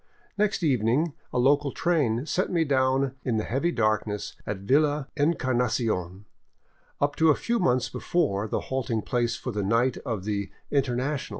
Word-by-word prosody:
Next 205 Hz, -3 st, 0 dB
evening 135 Hz, +3 st, +2 dB, 0.2 s
a -, -, -2 dB
local 140 Hz, +3 st, +3 dB
train 145 Hz, -8 st, +1 dB
set 185 Hz, +4 st, 0 dB
me 170 Hz, -2 st, +2 dB
down 135 Hz, -2 st, +1 dB
in 120 Hz, -3 st, 0 dB
the 110 Hz, -, 0 dB
heavy 140 Hz, +10 st, 0 dB
darkness 110 Hz, -4 st, -1 dB
at 100 Hz, -2 st, -3 dB
Villa 145 Hz, +5 st, +2 dB
Encarnacion, 120 Hz, -, 0 dB, 0.7 s
up 145 Hz, 0 st, +1 dB
to 160 Hz, 0 st, +4 dB
a 150 Hz, -, +5 dB
few 235 Hz, 0 st, -1 dB
months 125 Hz, -6 st, +2 dB
before 115 Hz, -, -1 dB
the -, -, -2 dB
halting 120 Hz, -5 st, -2 dB
place 120 Hz, -2 st, 0 dB
for 125 Hz, -, -5 dB
the 105 Hz, -2 st, -2 dB
night 115 Hz, +5 st, +1 dB
of 110 Hz, -6 st, -4 dB
the 100 Hz, -1 st, -2 dB
" -, -, -41 dB
Internacional." 135 Hz, 0 st, 0 dB
130 Hz, 165 wpm, -26 LUFS, 110-145 Hz, 0.7 s, a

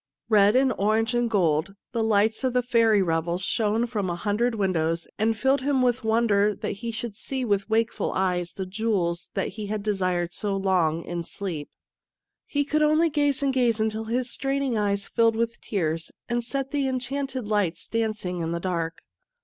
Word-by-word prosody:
Red 210 Hz, 0 st, +5 dB
and 260 Hz, -1 st, +4 dB
orange 220 Hz, +3 st, +2 dB
and 240 Hz, -1 st, +1 dB
gold, 175 Hz, -3 st, +1 dB, 0.2 s
the 230 Hz, -, -1 dB
lights 220 Hz, +2 st, +2 dB
of 260 Hz, -2 st, +1 dB
the 250 Hz, 0 st, +2 dB
fairy 225 Hz, -4 st, +4 dB
revels 170 Hz, +1 st, -1 dB
shone 220 Hz, +3 st, +1 dB
from 210 Hz, -6 st, -2 dB
a 175 Hz, -, -1 dB
hundred 215 Hz, +6 st, 0 dB
windows 170 Hz, -5 st, 0 dB
and 220 Hz, +1 st, +2 dB
filled 265 Hz, +5 st, +2 dB
him 270 Hz, -1 st, +1 dB
with 245 Hz, 0 st, +1 dB
wonder 215 Hz, -2 st, +2 dB
that -, -, -4 dB
he 235 Hz, -, -3 dB
should 225 Hz, -1 st, -4 dB
see 260 Hz, +4 st, -3 dB
with 200 Hz, -2 st, 0 dB
wakeful 225 Hz, +1 st, 0 dB
eyes 180 Hz, -2 st, 0 dB
the 190 Hz, -, -4 dB
jewels 185 Hz, -4 st, -1 dB
that -, -, 0 dB
he 215 Hz, -2 st, -6 dB
had 210 Hz, 0 st, -3 dB
desired 185 Hz, -4 st, 0 dB
so 205 Hz, -2 st, -2 dB
long 175 Hz, -4 st, +1 dB
in 175 Hz, 0 st, -4 dB
sleep. 170 Hz, -3 st, -5 dB, 0.8 s
He 285 Hz, -1 st, 0 dB
could 305 Hz, +1 st, +1 dB
only 310 Hz, +2 st, +4 dB
gaze 290 Hz, -1 st, +1 dB
and 275 Hz, -1 st, +2 dB
gaze 240 Hz, -4 st, +2 dB
until 220 Hz, 0 st, -1 dB
his 245 Hz, +2 st, -1 dB
straining 270 Hz, -2 st, -1 dB
eyes 200 Hz, -2 st, 0 dB
filled 230 Hz, -1 st, +3 dB
with 230 Hz, +1 st, -2 dB
tears, 165 Hz, -5 st, -2 dB, 0.2 s
and 240 Hz, 0 st, -1 dB
set 270 Hz, +3 st, -3 dB
the 285 Hz, -2 st, 0 dB
en 260 Hz, -1 st, 0 dB
chanted 265 Hz, -1 st, -3 dB
lights 205 Hz, -6 st, 0 dB
dancing 215 Hz, -6 st, -2 dB
in 165 Hz, 0 st, -2 dB
the 170 Hz, -, -2 dB
dark. 170 Hz, -2 st, -3 dB
215 Hz, 190 wpm, -25 LUFS, 185-240 Hz, 0.8 s, Red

